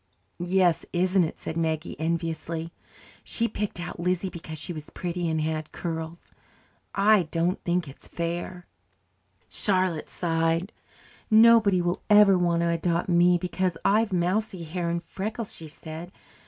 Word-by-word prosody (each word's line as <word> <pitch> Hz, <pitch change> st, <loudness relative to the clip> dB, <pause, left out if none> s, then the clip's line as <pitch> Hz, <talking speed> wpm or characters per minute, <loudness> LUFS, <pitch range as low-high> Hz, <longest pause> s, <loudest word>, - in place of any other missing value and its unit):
"Yes, 180 Hz, -1 st, +2 dB
isn't 185 Hz, +1 st, +3 dB
it?" 160 Hz, -, -7 dB
said 160 Hz, -, -5 dB
Maggie 160 Hz, 0 st, -1 dB
enviously. 165 Hz, 0 st, -3 dB, 0.5 s
"She 230 Hz, -, 0 dB
picked 210 Hz, -4 st, -3 dB
out 175 Hz, 0 st, -6 dB
Lizzie 180 Hz, +2 st, -1 dB
because 160 Hz, -2 st, -8 dB
she 150 Hz, +4 st, -4 dB
was 155 Hz, -2 st, -8 dB
pretty 175 Hz, -1 st, -3 dB
and 160 Hz, 0 st, 0 dB
had 155 Hz, 0 st, -3 dB
curls. 165 Hz, 0 st, -6 dB, 0.6 s
I 200 Hz, -3 st, +4 dB
don't 170 Hz, +3 st, 0 dB
think 175 Hz, -2 st, 0 dB
it 135 Hz, -, -11 dB
is -, -, -11 dB
fair." 175 Hz, +1 st, -4 dB, 0.8 s
Charlotte 185 Hz, -5 st, 0 dB
sighed. 165 Hz, +2 st, 0 dB, 0.6 s
"Nobody 220 Hz, -4 st, +6 dB
will 175 Hz, +1 st, -1 dB
ever 210 Hz, -2 st, +7 dB
want 170 Hz, -2 st, +2 dB
to 170 Hz, -, +1 dB
adopt 170 Hz, +1 st, 0 dB
me, 175 Hz, 0 st, +5 dB
because 180 Hz, 0 st, -1 dB
I've 215 Hz, +1 st, +3 dB
mousy 185 Hz, +1 st, 0 dB
hair 170 Hz, +1 st, -3 dB
and 170 Hz, +1 st, -2 dB
freckles," 210 Hz, +5 st, -5 dB
she 160 Hz, -, -9 dB
said. 160 Hz, +3 st, -8 dB
175 Hz, 145 wpm, -26 LUFS, 165-185 Hz, 0.8 s, ever